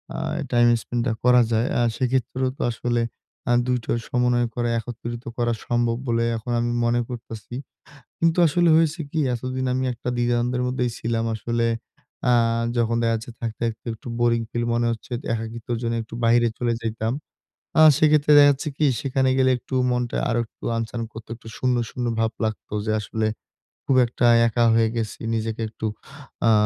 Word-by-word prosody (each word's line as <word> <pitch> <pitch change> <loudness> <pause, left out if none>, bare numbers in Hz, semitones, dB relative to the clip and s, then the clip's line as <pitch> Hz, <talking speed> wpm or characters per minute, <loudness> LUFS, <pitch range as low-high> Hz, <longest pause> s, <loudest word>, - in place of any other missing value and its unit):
আ - - -4 0.3
time 120 -1 +5
spend 120 +2 -2
টা 115 - +1
করা 125 0 +6
যায়। 115 +2 +2
আ - - +3 0.2
সেক্ষেত্রেও 130 0 0
তো - - -7
আসলে 120 +1 -1 0.5
আ - - +3
২ 125 0 +1
টা - - -4 0.2
সমন্বয় 125 -2 +2
করা 120 -1 0
একত্রিত 120 +1 -6
করা 120 -1 +1
সম্ভব 120 -1 +1
বলে 115 0 +1
এখন 110 +2 -5
আমি 120 0 0
মনে 120 +1 +2
করতাছি। 115 -1 -8 0.6
কিন্তু 165 +1 +2
আসলে 175 +3 +3
হয়েছে 160 0 +2
কি 160 - -2 0.2
এতদিন 130 +2 -3
আমি 130 - 0
একটা 120 +1 -7
দ্বিধাদ্বন্দ্বের 120 +1 +1
মধ্যেই 125 -1 0
ছিলাম 115 0 -1
আসলে 115 +2 -1 0.6
আ - - +5 0.4
যখন 115 0 +1
দেখাচ্ছে 115 +1 -1
থাকতে, 115 0 -5
থাকতে 115 +1 -5
একটু 110 - -11
বোরিং 120 -1 +3
ফিল 120 0 -1
মনে 120 0 +1
হচ্ছে 115 +2 -9 0.2
একাকিত্বর 115 +1 -4
জন্য 115 0 -1
একটু 110 - -11
বাইরে 120 0 +4
চলে 120 -1 0
যাইতাম। 110 0 -2 0.7
আ - - +8 0.2
সেক্ষেত্রে 150 -1 +4
দেখাচ্ছে 145 +1 +5
কি 155 - +2 0.2
সেখানে 130 -1 +1
গেলে 130 0 +4
একটু 125 +2 -6 0.2
মনটা 125 -1 -1
আরো 120 0 +1
একটু - - -27
আনচান 115 +1 -3
করত, 110 0 -10
একটু 115 0 -15
শূন্য, 125 -1 +1 0.2
শূন্য 125 - -3
ভাব 115 0 +1
লাগতো 110 -1 -5
যে - - +2
আসলে 110 +1 -2 0.6
খুব 135 - +3
একটা 120 +1 0 0.2
একা 120 +1 +1
হয়ে 115 -1 +4
গেছি। 110 -2 -3
নিজেকে 110 0 -2
একটু 110 0 -5 0.6
আ - - +6
120 Hz, 175 wpm, -23 LUFS, 115-125 Hz, 0.7 s, আ